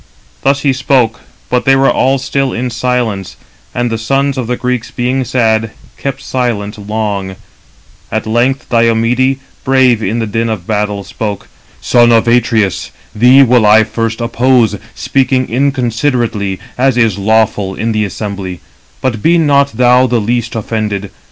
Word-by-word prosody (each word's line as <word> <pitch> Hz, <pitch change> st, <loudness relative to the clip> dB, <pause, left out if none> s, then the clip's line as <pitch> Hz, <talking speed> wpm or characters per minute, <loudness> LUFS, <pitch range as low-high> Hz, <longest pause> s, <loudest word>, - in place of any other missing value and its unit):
Thus 140 Hz, 0 st, +1 dB
he 140 Hz, -2 st, +2 dB
spoke; 125 Hz, -3 st, +1 dB, 0.3 s
but 125 Hz, 0 st, 0 dB
they 135 Hz, -, +5 dB
were 135 Hz, 0 st, +3 dB
all 135 Hz, +2 st, +2 dB
still 135 Hz, 0 st, -1 dB
in 125 Hz, +1 st, -3 dB
silence, 115 Hz, -6 st, -2 dB, 0.4 s
and 120 Hz, -1 st, -1 dB
the 115 Hz, -, -2 dB
sons 135 Hz, +4 st, 0 dB
of 130 Hz, -4 st, -3 dB
the 125 Hz, 0 st, -2 dB
Greeks 125 Hz, -2 st, -2 dB
being 130 Hz, +2 st, -1 dB
sad, 115 Hz, -2 st, +1 dB, 0.3 s
kept 140 Hz, -1 st, -5 dB
silent 115 Hz, -5 st, -2 dB
long: 100 Hz, -3 st, -2 dB, 0.8 s
at 110 Hz, +1 st, -2 dB
length 120 Hz, +5 st, 0 dB
Diomede, 115 Hz, +3 st, +2 dB, 0.2 s
brave 130 Hz, -3 st, +3 dB
in 110 Hz, +2 st, -1 dB
the 115 Hz, -, -1 dB
din 115 Hz, +2 st, -2 dB
of 105 Hz, -6 st, -4 dB
battle, 105 Hz, -1 st, -2 dB
spoke: 105 Hz, 0 st, -5 dB, 0.3 s
"Son 120 Hz, -1 st, +4 dB
of 115 Hz, 0 st, +3 dB
Atreus, 110 Hz, -, +1 dB, 0.2 s
thee 125 Hz, +5 st, +6 dB
will 125 Hz, -2 st, +3 dB
I 110 Hz, +1 st, +6 dB
first 115 Hz, +1 st, -3 dB
oppose, 120 Hz, -1 st, +2 dB, 0.2 s
speaking 130 Hz, -1 st, 0 dB
inconsiderately, 120 Hz, -5 st, -1 dB, 0.2 s
as 130 Hz, -1 st, +2 dB
is 110 Hz, -5 st, +2 dB
lawful, 105 Hz, -2 st, +1 dB
in 115 Hz, +1 st, -2 dB
the 110 Hz, -1 st, 0 dB
assembly; 100 Hz, -2 st, -5 dB, 0.4 s
but 120 Hz, -5 st, -1 dB
be 170 Hz, +8 st, +3 dB
not 140 Hz, -3 st, +2 dB
thou 125 Hz, +1 st, +4 dB
the 120 Hz, -1 st, +1 dB
least 120 Hz, +2 st, -2 dB
offended. 105 Hz, -3 st, -3 dB
115 Hz, 150 wpm, -13 LUFS, 110-130 Hz, 0.8 s, thee